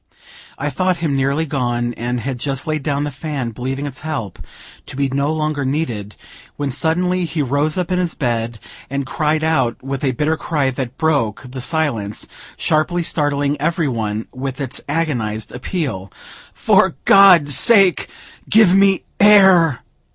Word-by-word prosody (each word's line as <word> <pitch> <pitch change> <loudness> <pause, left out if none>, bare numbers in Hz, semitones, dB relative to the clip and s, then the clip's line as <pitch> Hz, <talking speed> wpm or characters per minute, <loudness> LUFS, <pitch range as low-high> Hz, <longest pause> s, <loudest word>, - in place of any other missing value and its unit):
I 145 +1 -3
thought 185 +5 0
him 160 -4 -1
nearly 140 +4 0
gone, 120 -4 -2
and 120 +1 -3
had 130 +1 -4
just 135 +1 -2
laid 155 -1 -2
down 145 0 -1
the 145 - -3
fan, 135 -3 -4
believing 130 +5 -4
its 135 -2 -6
help 140 - -5 0.5
to - - -9
be 140 0 0
no 140 +3 0
longer 155 -2 -2
needed, 125 -8 -3 0.4
when 145 -2 -2
suddenly 175 +6 0
he 160 -2 -2
rose 145 +4 0
up 180 -1 -2
in 180 - +1
his 175 -3 -2
bed, 115 -3 -2 0.3
and 140 0 -3
cried 155 +3 -1
out 135 -7 0
with 135 +1 -5
a 135 -2 +1
bitter 155 +5 0
cry 145 -6 -1
that 130 -1 -5
broke 145 -10 0
the 130 +1 -7
silence, 125 -9 -1 0.3
sharply 165 +3 0
startling 145 -2 -1
every 165 0 0
one 110 -3 -3
with 130 +1 -5
its 140 - -5
agonized 120 -9 -2
appeal: 125 - -4 0.4
"For - - +2
God's 180 -8 +6
sake, 200 -6 +5 0.4
give 215 -4 +5
me 195 -1 +3 0.2
air!" 190 -9 +6
145 Hz, 160 wpm, -18 LUFS, 130-160 Hz, 0.5 s, God's